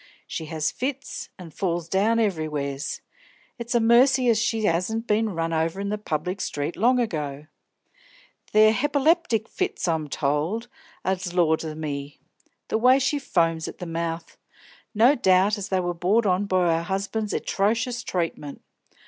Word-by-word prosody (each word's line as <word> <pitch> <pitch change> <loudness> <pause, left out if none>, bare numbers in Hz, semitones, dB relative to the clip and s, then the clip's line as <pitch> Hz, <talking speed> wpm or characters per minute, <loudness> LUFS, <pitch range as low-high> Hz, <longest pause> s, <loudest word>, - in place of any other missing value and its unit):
She 160 - -5
has 155 -1 -2
fits, 275 +1 -4
an' 175 -4 -10
falls 170 -1 -2
down 205 +6 +2
everywheres; 155 -9 -2 0.6
it's 235 +1 -3
a - - +5
mercy 245 +2 +4
as 225 -2 +3
she 220 -1 0
'asn't 205 +7 0
been 215 -3 0
run 165 0 -1
over 165 +3 0
in 200 0 -2
the 210 0 -2
public 180 +1 -3
street 145 +3 -3
long 250 +4 +3
ago. 150 - -3 1.1
They're 215 +1 +6
hepiplectic 285 - +1
fits, 375 - -2
I'm 160 -3 0
told, 150 - -1 0.4
an' 190 0 +1 0.2
laws 160 -3 +2
o' 155 -1 -5
me! 145 -2 -5 0.5
the 220 - +1
way 255 +3 +6
she 275 +2 0
foams 165 - 0
at - - -8
the 180 - -6
mouth! 165 0 -4 0.6
No 235 +6 +6
doubt 200 -3 +3
as 195 - -5
they 190 - +1
was 175 -1 -2
brought 210 +6 +2
on 190 +1 +2
by 175 -3 +2
her 170 - -8
'usband's 210 +2 -3
etrocious 230 +4 0
treatment. 165 -7 -4
190 Hz, 155 wpm, -25 LUFS, 165-225 Hz, 1.1 s, They're